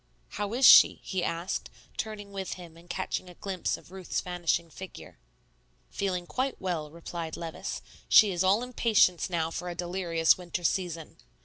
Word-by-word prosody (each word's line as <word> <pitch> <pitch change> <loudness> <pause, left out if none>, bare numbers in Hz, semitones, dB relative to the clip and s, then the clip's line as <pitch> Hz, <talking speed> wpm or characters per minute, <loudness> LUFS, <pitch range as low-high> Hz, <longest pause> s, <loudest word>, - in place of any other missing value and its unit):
"How 205 +2 -3
is 260 +2 +4
she?" - - +9
he 185 -2 -2
asked, 170 +3 -3 0.3
turning 210 -2 -5
with 195 -1 -4
him 175 -3 -11
and 170 +1 -17
catching 185 0 -3
a 180 - -13
glimpse 190 -1 -2
of - - -18
Ruth's 190 -2 -3
vanishing 170 -2 -1
figure. 190 - -10 0.7
"Feeling 180 -3 -2
quite 260 +8 -2
well," 170 -5 -3
replied 165 0 -6
Levice; 165 -1 -5 0.3
"she 210 -2 +7
is 180 0 0
all 200 +5 +3
impatience 220 -8 +2
now 165 -2 -1
for 180 +1 -4
a 175 - -5
delirious 175 -1 +1
winter 175 0 -5
season." 170 -3 -2
180 Hz, 165 wpm, -29 LUFS, 170-195 Hz, 0.7 s, she